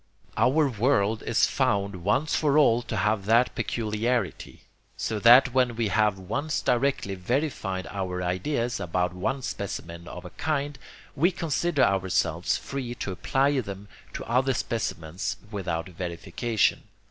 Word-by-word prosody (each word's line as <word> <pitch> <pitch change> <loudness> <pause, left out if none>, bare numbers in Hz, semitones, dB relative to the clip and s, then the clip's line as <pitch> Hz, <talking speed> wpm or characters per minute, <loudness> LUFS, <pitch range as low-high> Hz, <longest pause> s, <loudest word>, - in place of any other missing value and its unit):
Our 140 +6 +3
world 110 -3 +1
is - - +4
found 100 -1 0
once 130 - +1
for 150 -2 +2
all 120 -6 +5
to 115 -3 -4
have 105 -1 +1
that 115 +3 +4
peculiarity. 110 -3 -2 0.3
So 110 - -2
that 120 +3 +7
when 125 -3 +2
we 115 -2 0
have 105 0 +2
once 140 +12 -2
directly 125 -5 0
verified 95 - -2
our 90 -2 -3
ideas 120 +7 -1
about 90 +1 -1
one 130 +9 -2
specimen 85 -5 -5
of 90 0 -8
a 90 - -8
kind, 145 -3 -2 0.4
we 165 +6 +4
consider 165 -3 0
ourselves 95 -2 +1
free 125 -3 -5
to 100 - -4
apply 135 +9 +1
them 100 -3 -7 0.2
to - - -5
other 130 +2 +1
specimens 100 -4 -3
without 85 -5 -3
verification. 90 +6 -1
110 Hz, 135 wpm, -26 LUFS, 95-130 Hz, 0.4 s, that